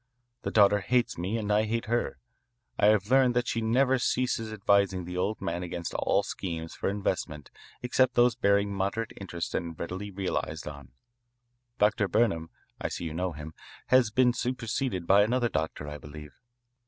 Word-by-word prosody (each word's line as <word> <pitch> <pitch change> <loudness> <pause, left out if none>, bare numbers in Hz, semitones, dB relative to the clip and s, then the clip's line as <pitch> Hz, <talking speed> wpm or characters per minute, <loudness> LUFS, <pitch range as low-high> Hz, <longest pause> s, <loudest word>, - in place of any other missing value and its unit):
The - - -3
daughter 105 -1 +5
hates 120 -1 0
me 95 +6 -1
and 105 -2 -2
I 105 +1 +3
hate 115 +1 -2
her. 120 +1 -1 0.6
I 105 - +5
have 105 +1 +3
learned 130 -2 +5
that 120 0 +1
she 115 - -1
never 130 +4 +2
ceases 120 -3 0
advising 100 -3 +2
the 90 +1 -6
old 100 +4 -1
man 85 +1 -3
against 85 -1 -5
all - - +1
schemes 80 -3 -5
for - - -2
investment 90 -7 -3 0.3
except 125 0 +2
those 120 0 +5
bearing 100 -3 +2
moderate 100 +4 -2
interest 85 -3 -5
and 85 -2 -3
readily 95 +4 -5
realised 95 -1 -3
on. 70 -3 -9 0.9
Dr. 105 -2 +2
Burnham 95 -6 +1 0.3
I - - -1
see - - -5
you 80 -2 -4
know 90 +1 -2
him 75 +1 -8 0.4
has 130 -3 +5
been 125 +2 +3
superseded 120 -6 -2
by 100 +3 +6
another 120 +3 +2
doctor, 80 -3 -3
I 75 0 -6
believe. 75 0 -11
100 Hz, 170 wpm, -28 LUFS, 85-120 Hz, 0.9 s, by